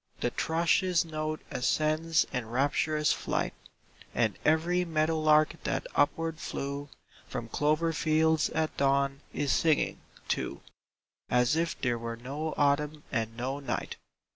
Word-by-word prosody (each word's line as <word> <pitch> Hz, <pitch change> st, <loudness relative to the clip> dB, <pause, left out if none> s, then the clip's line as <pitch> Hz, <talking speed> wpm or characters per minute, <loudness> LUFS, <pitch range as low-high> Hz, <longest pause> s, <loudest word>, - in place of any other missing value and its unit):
The -, -, 0 dB
thrush's 170 Hz, +2 st, +2 dB
note 155 Hz, -1 st, -3 dB
ascends 155 Hz, +5 st, +1 dB
in 125 Hz, -3 st, -2 dB
rapturous 145 Hz, +4 st, +1 dB
flight, -, -, -2 dB, 0.6 s
And -, -, +2 dB
every 170 Hz, +3 st, +3 dB
meadow 160 Hz, -1 st, +1 dB
lark 155 Hz, 0 st, +3 dB
that -, -, -1 dB
upward 160 Hz, +2 st, +1 dB
flew 140 Hz, -1 st, -4 dB, 0.4 s
From 120 Hz, -2 st, -5 dB
clover 155 Hz, +6 st, +1 dB
fields 160 Hz, 0 st, +2 dB
at 160 Hz, -1 st, -1 dB
dawn 140 Hz, 0 st, +2 dB
is 145 Hz, -2 st, -1 dB
singing, 160 Hz, -2 st, +2 dB, 0.3 s
too, -, -, -2 dB, 0.7 s
As 125 Hz, +3 st, +3 dB
if 165 Hz, +1 st, -1 dB
there 120 Hz, -3 st, 0 dB
were 115 Hz, 0 st, -5 dB
no 145 Hz, +6 st, -4 dB
Autumn 150 Hz, +1 st, +1 dB
and 115 Hz, -1 st, -2 dB
no 130 Hz, +3 st, -2 dB
night. 140 Hz, -, -4 dB
150 Hz, 130 wpm, -29 LUFS, 140-160 Hz, 0.7 s, every